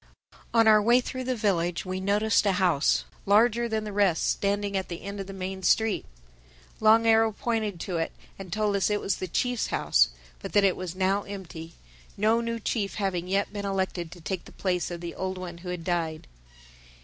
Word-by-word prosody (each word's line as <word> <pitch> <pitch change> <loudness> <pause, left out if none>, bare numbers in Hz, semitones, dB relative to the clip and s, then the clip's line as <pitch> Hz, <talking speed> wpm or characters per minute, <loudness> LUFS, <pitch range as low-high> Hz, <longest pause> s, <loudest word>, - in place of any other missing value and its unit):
On 225 -1 +4
our 215 -1 +7
way 235 +4 +5
through 255 0 -5
the 255 0 0
village 180 -6 0
we 185 0 -3
noticed 205 +2 +2
a 195 - +3
house, 180 -6 +2 0.2
larger 235 +3 +4
than 220 -1 -1
the 210 -1 -6
rest, 195 -5 +2
standing 200 0 0
at 190 -1 -2
the 170 - -6
end 200 +1 -6
of 195 - -5
the - - -7
main 190 0 -5
street. 220 +3 +2 0.7
Long 220 +1 +5
Arrow 225 0 +5
pointed 215 -4 -2
to 180 -3 -3
it 165 - -1 0.3
and 190 -2 -8
told 210 +1 0
us 195 -1 +2
it 210 0 +1
was 195 - -1
the 185 - -4
Chief's 245 +6 0
house, - - +3 0.3
but - - -8
that 205 - +5
it 190 -2 +3
was 180 -1 -6
now 190 +2 +1
empty—no 175 - -4
new 230 0 -3
chief 210 -2 -2
having 185 -4 -2
yet 200 +2 0
been 205 -1 -4
elected 190 -4 -2
to 175 - -13
take 185 +2 -4
the - - -13
place 180 -2 -1
of 175 -1 -6
the 170 -1 -5
old 190 0 -4
one 175 -2 -7
who 180 +1 -8
had 180 -2 -4
died. 165 -3 -2
195 Hz, 205 wpm, -27 LUFS, 180-215 Hz, 0.7 s, our